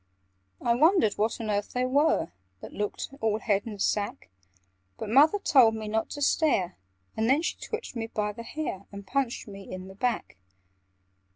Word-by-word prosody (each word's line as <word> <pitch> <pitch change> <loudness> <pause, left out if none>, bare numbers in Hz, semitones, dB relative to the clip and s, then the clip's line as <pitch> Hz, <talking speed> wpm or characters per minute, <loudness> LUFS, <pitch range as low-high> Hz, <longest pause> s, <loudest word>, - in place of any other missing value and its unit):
"I 235 - +2
wondered 295 - +4
what 220 +3 +1
on 220 -2 -2
earth 205 0 -2
they 250 0 +1
were, 285 - +2 0.3
That - - -9
looked 210 +5 -4
all 220 -1 +2
head 205 -1 0
and 210 -3 -7
sack; 205 - -1 0.7
But 215 - -5
Mother 290 - +6
told 255 - +5
me 220 -1 -5
not 220 +1 -1
to 290 - -2
stare, 195 - +2 0.4
And 220 +2 +1
then 285 +5 +4
she - - -1
twitched 445 - -6
me 225 -1 -3
by 210 -2 -2
the 225 +3 -9
hair, 230 -7 -5
And 200 -1 -9
punched 255 +1 -1
me 195 -1 -10
in 185 0 -7
the - - -10
back. 240 - -2
225 Hz, 180 wpm, -28 LUFS, 205-265 Hz, 0.7 s, Mother